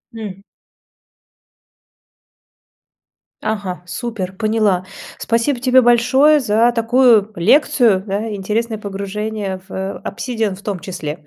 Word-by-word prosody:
М. 200 -3 -7 3.0
Ага, 200 -5 -4
супер, 190 -1 -5
поняла. 215 -3 +1 0.4
Спасибо 235 +3 0
тебе 255 0 +4
большое 255 +5 +4
за 230 -1 +2
такую 230 -2 +3
лекцию, 215 - +3
да, 210 +2 -3
интересное 215 +3 -2
погружение 200 -1 -4
в 190 0 -5
"Обсидиан" 225 -6 -3
в 195 - -14
том 200 -3 -3
числе. 155 -4 -6
215 Hz, 95 wpm, -18 LUFS, 195-235 Hz, 3.0 s, тебе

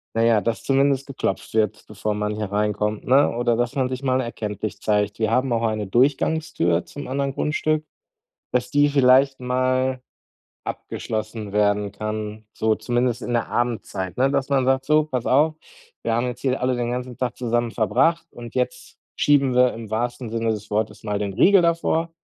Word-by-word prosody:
Na 115 - +2
ja, 115 -2 +4
dass 115 +3 -2
zumindest 135 0 +2
geklopft 130 -8 -3
wird, 105 -1 0
bevor 105 0 -3
man 105 0 -2
hier 105 -2 -4
reinkommt, 105 +1 -1
ne? 135 +3 +5
Oder 120 -1 +1
dass 120 +2 -1
man 130 -2 +1
sich 130 +1 -5
mal 130 -1 +1
erkenntlich 110 -4 -4
zeigt. 105 0 0
Wir 110 -1 +1
haben 125 +2 +1
auch 115 0 +1
eine 110 -2 -1
Durchgangstür 125 - +1
zum 145 - -8
anderen 140 +1 -1
Grundstück, 155 +2 0 0.7
dass 125 0 0
die 145 +1 +3
vielleicht 135 0 +4
mal 130 +1 0 0.6
abgeschlossen 110 -1 -5
werden 105 -1 +1
kann, 110 0 -5
so 110 0 +1
zumindest 120 +2 -1
in 120 - -4
der 120 -1 0
Abendzeit, 105 -6 -2
ne? 130 +2 +3
Dass 140 0 -1
man 135 -2 +2
sagt: 130 0 +2
„So, 155 +2 +3
pass 130 -6 -3
auf, 155 +4 +3 0.5
wir 115 - 0
haben 120 +2 +1
jetzt 125 0 -6
hier 130 -1 0
alle 125 0 +1
den 120 -1 -2
ganzen 125 0 -4
Tag 125 -1 -2
zusammen 120 -1 0
verbracht 165 +9 +1
und 120 -1 -10
jetzt 125 0 -3 0.2
schieben 140 -3 +3
wir 125 0 +4
im 115 -2 -8
wahrsten 120 +2 -2
Sinne 115 0 -1
des 105 -1 -5
Wortes 105 +1 -2
mal 105 -1 -1
den 100 -2 -3
Riegel 195 - +5
davor. 170 -1 +1
120 Hz, 185 wpm, -23 LUFS, 110-130 Hz, 0.7 s, ne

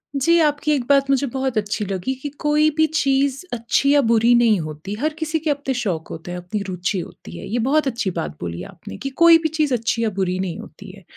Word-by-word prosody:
जी, 335 +5 +3
आपकी 300 -1 +1
एक 280 -4 +1
बात 275 -1 +4
मुझे 275 0 +2
बहुत 265 -1 -2
अच्छी 210 0 -1
लगी 195 +5 -2
कि 290 - -4
कोई 300 +1 +3
भी 315 - +5
चीज़ 275 -3 +1
अच्छी 240 +4 +1
या 290 - +5
बुरी 230 -1 +4
नहीं 230 -4 +4
होती। 155 +4 -6
हर 305 +4 0
किसी 320 0 -1
के 315 0 -2
अपने 285 -2 -1
शौक 190 -10 -2
होते 165 +2 -8
हैं, 180 - -4
अपनी 180 +4 -4
रूचि 185 +1 -2
होती 85 - -9
है। - - -8
ये 235 +4 -1
बहुत 300 +1 +2
अच्छी 230 -7 -1
बात 75 0 -5
बोली 85 0 -5
आपने 205 - -10
कि 275 - -4
कोई 335 -1 +9
भी 315 - +1
चीज़ 305 -3 0
अच्छी 230 -1 0
या 225 - +2
बुरी 185 -1 0
नहीं 185 -3 -3
होती - - -11
है। - - -15
245 Hz, 235 wpm, -21 LUFS, 190-290 Hz, -, कोई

